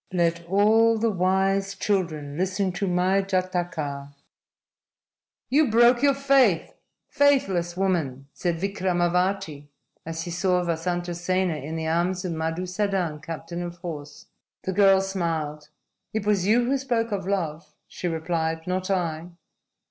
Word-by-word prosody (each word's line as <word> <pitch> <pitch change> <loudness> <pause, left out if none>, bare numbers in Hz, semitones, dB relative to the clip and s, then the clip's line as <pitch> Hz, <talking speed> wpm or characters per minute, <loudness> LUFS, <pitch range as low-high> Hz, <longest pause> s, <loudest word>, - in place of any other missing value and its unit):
_ - - -2
LET 170 0 +1
ALL 220 +4 +4
THE 225 +1 +1
WISE 195 +1 +1
CHILDREN 165 -8 -1
LISTEN 185 +2 0
TO 195 +3 -2
MY 185 +2 +2
JATAKA! 175 -7 -2 1.4
"You 290 0 +4
broke 240 +2 +5
your 280 -1 +4
faith, 270 -10 +3 0.3
faithless 195 -12 +2
woman!" 155 -9 -1
said 175 -2 -1
Vikramavati 180 -3 -1 0.4
as 165 0 -5
he 175 - -6
saw 180 +1 +1
Vasantasena 175 0 -1
in 155 +3 -5
the 160 0 -3
arms 175 +3 0
of 175 - -2
Madusadan, 180 0 -2
captain 165 +2 -6
of 175 0 -6
horse. 155 -5 -8 0.4
The 190 - -2
girl 195 0 +5
smiled. 160 -6 -3 0.5
"It 220 -2 -1
was 200 -3 +2
you 240 +3 +4
who 270 +2 +1
spoke 235 -4 -1
of 195 -3 -3
love," 160 -6 -3
she 180 - -5
replied, 160 -1 -2
"not 185 +1 -2
I." 170 -4 -1
180 Hz, 135 wpm, -25 LUFS, 165-195 Hz, 1.4 s, broke